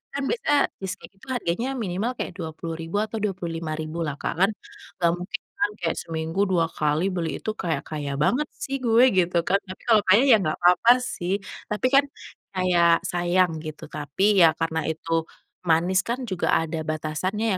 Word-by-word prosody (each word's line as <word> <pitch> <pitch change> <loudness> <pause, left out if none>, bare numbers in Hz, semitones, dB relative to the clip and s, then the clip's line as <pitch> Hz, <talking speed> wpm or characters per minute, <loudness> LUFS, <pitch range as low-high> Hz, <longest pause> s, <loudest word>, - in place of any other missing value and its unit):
kan 280 - -1
biasanya 465 -12 +2 0.2
cheese 190 -1 -4
cake - - -14
itu 265 - -17
harganya 230 +2 -1 0.2
minimal 195 +5 -1
kayak - - -3
Rp20.000 165 +1 -5
atau 220 +1 -4
Rp25.000 165 -5 -3
lah 145 - -3
Kak - - -3
kan, 195 - +5 0.5
gak 170 - +5
mungkin 180 +2 -5 0.2
kan 205 - +2
kayak 165 - 0
seminggu 160 +2 -4
2 170 -2 +3
kali 150 +2 0
beli 170 -3 -2
itu, 215 - -1
kayak 160 -6 -1
kaya 145 -2 -3
banget 290 - +1 0.2
sih 275 0 -2
gue 235 -1 +4
gitu 180 -2 +1
kan. 195 +3 +2
Tapi 185 - -9
kalau 220 -3 +6
kaya 195 +5 +6
ya 225 - +10
gak 155 - 0
apa-apa 180 +7 +5
sih. 180 -5 -3 0.3
Tapi 210 +4 0
kan 280 +1 +6 0.5
kayak 175 -2 +3
sayang 175 0 +2
gitu. 155 -1 -8
Tapi 150 +4 -3 0.2
ya 170 - +8
karena 165 -1 -1
itu 160 +1 -4 0.5
manis 175 +3 +2
kan 240 +2 -2
juga 185 -2 0
ada 160 0 -3
batasannya 155 +7 -2
175 Hz, 175 wpm, -24 LUFS, 160-205 Hz, 0.5 s, ya